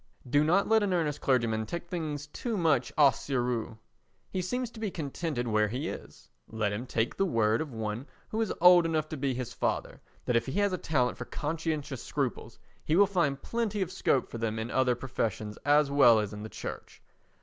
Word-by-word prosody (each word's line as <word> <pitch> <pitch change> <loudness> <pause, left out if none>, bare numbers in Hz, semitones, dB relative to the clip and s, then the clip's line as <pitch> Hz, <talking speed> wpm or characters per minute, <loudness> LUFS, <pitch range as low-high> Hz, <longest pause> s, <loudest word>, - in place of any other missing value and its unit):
Do 145 +4 +3
not 180 +6 +3
let 220 0 +4
"An 200 -2 +1
Earnest 155 -4 0
Clergyman" 115 -4 +1
take 170 0 -5
things 155 -5 -4
too 220 +9 -4
much 155 -8 +2
au 145 -2 +8
sérieux. 120 -3 -2 0.5
He 185 - -1
seems 245 +6 -2
to 230 - -11
be 215 -2 -1
contented 150 -5 -3
where 105 -1 +2
he 130 +9 -3
is; - - -10 0.2
let 105 -2 -1
him 120 +5 -4
take 115 0 -1
the 195 - +2
word 110 -6 +2
of 155 -3 -5
one 110 +3 -4 0.2
who 220 - -1
is 220 - 0
old 175 -1 +7
enough 155 -2 0
to - - -4
be 135 -2 -1
his 125 -2 -4
father, - - -2 0.2
that 125 - +1
if 115 - +1
he 130 - -3
has 205 -2 +2
a 180 - -2
talent 125 -5 0
for - - -4
conscientious 155 -4 -3
scruples 125 -5 -3 0.3
he 155 - +1
will 200 +3 +7
find 170 -9 0
plenty 215 -4 -1
of 180 - -7
scope 140 -7 +1
for 115 - -7
them 110 -1 -1
in 110 +2 -4
other 130 -2 +2
professions 115 -4 -3
as 145 0 +4
well 130 -5 +7
as 105 -1 -1
in 105 - -7
the 110 - -6
Church. - - -8
140 Hz, 210 wpm, -29 LUFS, 115-170 Hz, 0.5 s, au